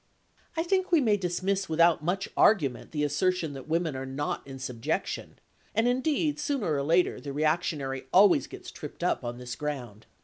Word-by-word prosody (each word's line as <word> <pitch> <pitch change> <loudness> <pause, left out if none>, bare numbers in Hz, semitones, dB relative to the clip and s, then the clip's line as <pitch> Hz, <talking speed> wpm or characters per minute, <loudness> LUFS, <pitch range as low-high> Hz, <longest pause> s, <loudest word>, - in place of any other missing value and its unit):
I 325 - +2
think 375 +1 0
we 335 - +6
may 220 -7 +3
dismiss 190 +1 -1
without 165 0 +4
much 185 +4 -1
argument 145 - +3
the 150 -2 -2
assertion 160 +2 0
that 135 0 -9
women 160 -2 0
are 130 - -4
not 135 +2 -3
in 135 -1 -8
subjection, 125 -3 -3 0.4
and 225 +2 +3
indeed, 290 +4 +1
sooner 270 - -1
or 140 - 0
later, 165 +5 +2
the 140 - -6
reactionary 150 -3 -1
always 195 +1 +6
gets - - -10
tripped - - -8
up - - +1
on 120 0 -4
this 125 -1 -6
ground. 125 -8 -5
160 Hz, 175 wpm, -28 LUFS, 140-195 Hz, 0.4 s, we